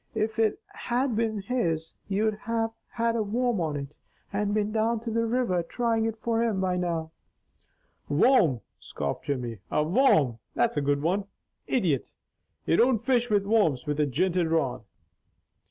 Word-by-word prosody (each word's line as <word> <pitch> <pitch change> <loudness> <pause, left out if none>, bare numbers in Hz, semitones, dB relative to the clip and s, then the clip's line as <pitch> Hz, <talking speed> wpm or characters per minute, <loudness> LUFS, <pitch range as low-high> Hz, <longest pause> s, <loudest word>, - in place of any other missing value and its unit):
If 220 +1 -1
it 220 -2 +2
had 245 0 -1
been 220 -2 -1
his, 170 -9 -1
you'd 215 +2 +1
have 225 +1 -2 0.2
had 230 -1 0
a 230 - +1
worm 230 0 0
on 155 -3 -1
it 140 +1 -6 0.4
and 205 0 0
been 210 0 0
down 225 +1 +1
to 230 -1 -4
the 230 +1 +1
river 230 -7 +1
trying 225 +5 0
it 225 0 -2
for 230 +1 0
him 225 -4 0
by 185 -1 0
now." 165 -3 -2 1.0
"Worm!" 150 - +4 0.2
scoffed 70 -1 -4
Jimmy. 120 -6 -3
"A 150 - +1
worm! 155 - +3 0.2
That's - - +2
a 145 - +1
good 140 0 0
one! 190 +5 +1 0.4
Idjit! 170 - 0 0.5
You 165 - +3
don't 235 -2 +3
fish 245 -2 +2
with 205 -2 +2
worms 200 - +2
with 150 0 -2
a 150 - +3
jinted 175 +5 +1
rod." 160 -6 0
205 Hz, 165 wpm, -27 LUFS, 160-230 Hz, 1.0 s, Worm